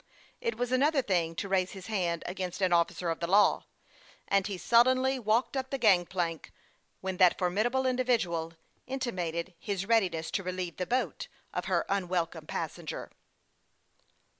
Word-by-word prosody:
It 465 -2 -2
was 245 0 -2
an 255 0 +2
other 290 -2 +3
thing 170 -6 0
to 200 - -3
raise 190 -1 +1
his 190 -2 -9
hand 175 -6 -1
against 185 0 -4
an 185 -2 +2
officer 170 0 +1
of 165 - -4
the 170 - -2
law, 205 +3 +4 0.6
and 195 0 +2
he 200 -3 -4
sullenly 255 +5 +3
walked 230 +4 +1
up 265 -1 -2
the 275 - -2
gang 195 -8 +4
plank 170 -4 -3 0.5
when 190 -1 -3
that 180 -1 +5
formidable 215 +9 +1
individual 230 -11 0 0.3
intimated 185 -10 -3
his 195 -2 -3
read 225 +1 +5
iness 160 0 -4
to - - -1
relieve 185 -2 -4
the 180 - -3
boat 255 +6 -1 0.3
of - - -2
her - - +1
unwelcome 175 -5 -1
passenger. 165 -1 -5
190 Hz, 165 wpm, -30 LUFS, 175-240 Hz, 0.6 s, that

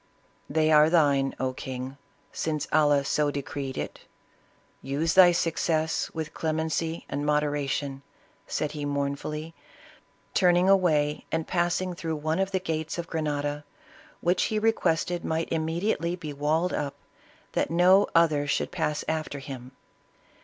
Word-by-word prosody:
"They 155 +1 +2
are 150 0 +6
thine, 140 -5 +3
oh 130 0 -1
king, 130 +1 -6 0.4
since 155 -2 -2
Allah 145 -2 +4
so 150 +1 +1
decreed 140 -1 -4
it; - - -5 0.8
use 150 +5 -1
thy 185 -2 +8
success 160 -1 0
with 160 -1 -5
clemency 160 +1 -2
and 145 +1 -3
moderation," 145 -2 -1 0.5
said 150 - -2
he 150 -1 -5
mournfully, 145 +3 -3 0.8
turning 180 0 +4
away 155 -7 +3
and 160 0 -1
passing 180 +1 0
through 165 -2 -3
one 155 +3 -1
of 195 0 +1
the 190 -1 0
gates 160 -2 -3
of 170 - -3
Grenada, 145 -2 -2 0.6
which 175 +1 +2
he 215 - -1
requested 180 -6 +1
might 160 +1 -1
immediately 170 +2 0
be 155 -5 -7
walled 155 +5 0
up, 145 -1 -2 0.6
that - - 0
no 180 +4 +5
other 155 -4 +4
should 145 - 0
pass 160 -4 -2
after 155 -2 -2
him. 130 -2 -8
155 Hz, 135 wpm, -27 LUFS, 145-170 Hz, 0.8 s, thy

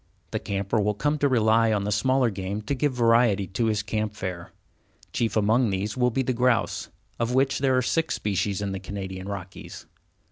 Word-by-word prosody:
The - - -1
camper 100 +2 -1
will 105 0 0
come 145 +7 0
to 145 - +3
rely 115 -2 +3
on 105 -2 +1
the 105 - -2
smaller 125 +3 +2
game 100 +2 -4
to 125 - -2
give 145 +1 +1
variety 115 -4 +3
to 95 +6 -2
his 105 -2 0
camp 105 0 -2
fare. 90 -4 -5 0.6
Chief 115 -1 0
among 110 +3 +3
these 100 +2 -2
will 125 -1 +2
be 130 +3 0
the 130 - 0
grouse, 125 -1 +1 0.3
of 115 +2 0
which 135 0 +2
there 130 -1 +2
are 130 - +2
six 160 +5 0
species 100 0 -1
in 100 - -2
the 95 - -4
Canadian 95 0 -6
Rockies. 95 -2 -8
110 Hz, 200 wpm, -25 LUFS, 100-125 Hz, 0.6 s, to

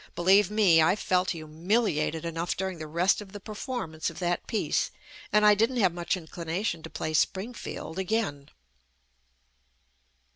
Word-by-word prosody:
Believe 190 +3 +4
me, 200 -6 +5
I 160 +4 +4
felt 185 -3 +1
humiliated 160 0 -1
enough 165 +1 -2
during 190 -2 -3
the 155 - -6
rest 175 +7 +2
of 195 -2 -12
the 205 - -7
performance 210 - -4
of - - -12
that 175 -1 -1
piece, 220 - 0 0.4
and 210 0 +4
I 210 - +8
didn't 225 +5 +1
have 190 -7 +3
much 175 +2 -1
inclination 170 +2 -3
to 160 - -9
play 155 - -4
Springfield 190 -1 -2
again. 190 -8 -2
180 Hz, 145 wpm, -28 LUFS, 160-210 Hz, 0.4 s, I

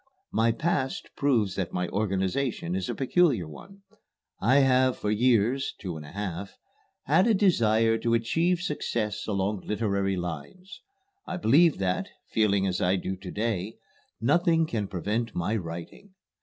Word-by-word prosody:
My 115 +1 +3
past 135 +1 -2
proves 115 -9 +1
that 95 -2 -3
my 90 0 -1
organization 100 0 -1
is 95 -1 -2
a - - -2
peculiar 135 - +2
one. 195 - -13 0.6
I 120 +6 +3
have 130 -1 +3
for 105 - -2
years 120 +3 +2
(two 90 -5 -5
and 80 - -7
a 75 - -11
half) 100 -1 -5 0.5
had 165 - +3
a 225 - +4
desire 115 - +3
to 115 0 +1
achieve 165 +10 +1
success 110 - -2
along 100 0 -1
literary 100 -3 0
lines. 90 - -7 0.5
I 185 - -3
believe 160 +3 +4
that, 95 -1 -1 0.2
feeling 100 -3 +2
as 90 -2 -1
I 90 +2 +3
do 95 0 -3
to 95 0 -9
day, 110 -1 -2 0.4
nothing 165 - +3
can 110 -9 -3
prevent 105 +5 -2
my 90 +6 -1
writing. 85 - -7
110 Hz, 150 wpm, -27 LUFS, 95-135 Hz, 0.6 s, a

